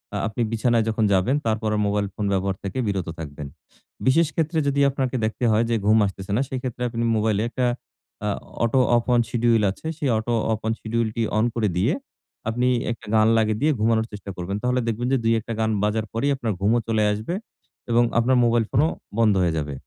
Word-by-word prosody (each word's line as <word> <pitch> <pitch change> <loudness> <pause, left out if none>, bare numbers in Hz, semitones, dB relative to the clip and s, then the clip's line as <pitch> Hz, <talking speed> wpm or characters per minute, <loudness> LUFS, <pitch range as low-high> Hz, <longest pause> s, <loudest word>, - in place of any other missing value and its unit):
আ - - 0
আপনি 110 +2 -4
বিছানায় 115 0 +2
যখন 110 0 0
যাবেন, 95 +8 +2
তারপর 110 -1 0
আর 105 - 0
মোবাইল 100 0 0
ফোন 105 +1 -3
ব্যবহার 95 0 0
থেকে 100 +4 -4
বিরত 95 -3 -2
থাকবেন। 75 -2 -7 0.6
বিশেষ 160 +5 +4
ক্ষেত্রে 160 0 0
যদি 140 0 +1
আপনাকে 130 -1 -2
দেখতে 110 +3 -2
হয় 110 +1 +3
যে, 115 - +2
ঘুম 110 +1 +6
আসতেছে 95 0 -5
না, - - +2
সেক্ষেত্রে 125 -2 -5
আপনি 115 0 -3
মোবাইলে 105 -1 +1
একটা 125 +1 -1 0.6
আ - - +1 0.4
অটো 125 +3 +2 0.2
অফ 120 - 0
অন 120 - +4
শিডিউল 115 -2 +2
আছে; 130 - -9
সেই 145 -4 -1
auto 120 +2 -2 0.2
off 110 - -3
on 110 - +1
schedule 115 +1 -1
T 115 - 0
on 110 - +3
করে 115 -3 +1
দিয়ে, 110 - +2 0.6
আপনি 120 +2 0 0.2
একটি 115 - -7
গান 110 0 +5
লাগিয়ে 110 -1 +1
দিয়ে 155 +2 +3
ঘুমানোর 110 0 +2
চেষ্টা 100 -1 -8
করবেন। 90 +3 -3
তাহলে 125 +1 +1
দেখবেন 115 +2 -1
যে - - +4
২, 115 0 +3
১ - - -11
টা 115 - -3
গান 110 - +1
বাজার 105 +1 0
পরেই 140 +6 +1
আপনার 115 -5 -2
ঘুমও 110 +4 +3
চলে 110 -1 +1
আসবে 110 +10 -3 0.6
এবং 120 +1 +5 0.2
আপনার 125 +2 +3
মোবাইল 120 0 +3
ফোনও 150 +4 +3 0.3
বন্ধ 110 -2 +4
হয়ে 85 -3 +1
যাবে। 75 -1 -4
115 Hz, 210 wpm, -23 LUFS, 105-120 Hz, 0.6 s, ঘুম